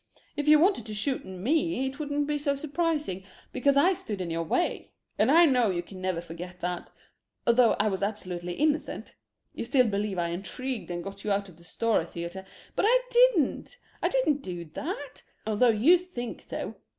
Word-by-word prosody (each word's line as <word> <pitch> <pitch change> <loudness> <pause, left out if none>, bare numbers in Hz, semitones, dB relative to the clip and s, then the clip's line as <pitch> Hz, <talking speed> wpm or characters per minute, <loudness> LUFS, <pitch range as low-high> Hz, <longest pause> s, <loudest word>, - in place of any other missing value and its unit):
If 290 0 -3
you 305 0 +8
wanted 370 - +2
to 215 - -5
shoot 260 +6 -2
me 265 - 0
it 265 +2 -5
wouldn't 290 -1 -1
be 295 0 -1
so 280 -1 0
surprising, 300 - -2 0.3
because 275 +2 +2
I 355 +7 +5
stood 235 - -5
in 175 -2 -3
your 165 0 -1
way 165 - -1 0.3
and - - +4
I 340 +1 +7
know 250 -7 +3
you 175 -2 -1
can 185 +1 -11
never 185 -2 -1
forget 175 +2 -8
that 180 0 -3 0.6
although 235 0 +5
I 210 - +1
was 195 -2 -1
absolutely 180 -4 -3
innocent. 305 - -1 0.4
You - - -4
still 255 +2 +3
believe 205 -2 -1
I 170 -1 0
intrigued 225 +8 -4
and 175 -1 -4
got 195 +1 -8
you 210 - -1
out 200 0 0
of 170 - -16
the 170 - -17
Stora 195 0 0
theatre, 175 +3 -6 0.3
but - - +2
I - - +5
didn't. 485 - +3 0.2
I - - +2
didn't 310 - +1
do 175 -6 -6
that, 290 -4 -5 0.2
although 220 +3 +3
you 255 +12 +5
think 250 -10 -6
so. - - -6
230 Hz, 190 wpm, -28 LUFS, 185-295 Hz, 0.6 s, you